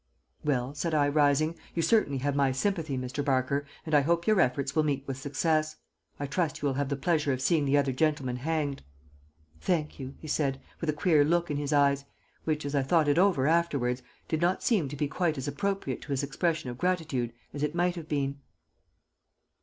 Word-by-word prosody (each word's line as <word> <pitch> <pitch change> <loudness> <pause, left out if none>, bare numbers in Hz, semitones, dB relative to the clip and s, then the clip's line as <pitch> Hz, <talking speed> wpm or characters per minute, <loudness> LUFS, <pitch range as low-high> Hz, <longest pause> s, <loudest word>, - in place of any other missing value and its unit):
"Well," 135 -2 0
said 160 +2 -1
I, 145 -1 +4
rising, 150 +2 +2 0.2
"you 165 - +1
certainly 210 -12 +3
have 140 0 0
my 140 -2 +3
sympathy, 155 0 -1
Mr. 130 +3 -3
Barker, 140 +1 0 0.2
and 155 - -4
I 145 - +6
hope 170 +4 +1
your 215 -4 +4
efforts 140 +1 0
will 155 - +4
meet 140 -3 0
with 135 -1 -5
success. 155 +3 0 0.4
I 145 - -2
trust 155 +3 -1
you - - -4
will 135 - +1
have 140 0 -1
the 140 - 0
pleasure 150 0 +1
of 130 - -3
seeing 145 +3 +2
the 140 +1 +3
other 140 -2 +2
gentleman 135 -2 0
hanged." 145 0 -2 0.8
"Thank 155 - -1
you," 135 0 -7
he 155 - -10
said, 140 -3 0 0.2
with 165 - -2
a - - +2
queer 155 -1 +4
look 170 +2 +1
in 145 - -1
his 145 0 -2
eyes, 140 -1 +3 0.4
which, 155 -2 -1
as 140 - -3
I 140 - +3
thought 155 +3 +2
it 145 +3 +3
over 180 -9 +3
afterwards, 140 -6 +1 0.3
did 160 0 -1
not 175 +2 +1
seem 190 - +2
to 145 - -6
be 145 +1 -1
quite 160 0 0
as 135 +1 -4
appropriate 195 -4 -2
to 145 - -8
his 140 0 0
expression 155 -1 -1
of 120 - -10
gratitude 160 -10 0 0.2
as 145 - -5
it 150 +2 -1
might 175 0 +1
have 165 -3 -7
been. 140 -1 -1
145 Hz, 210 wpm, -29 LUFS, 135-165 Hz, 0.8 s, I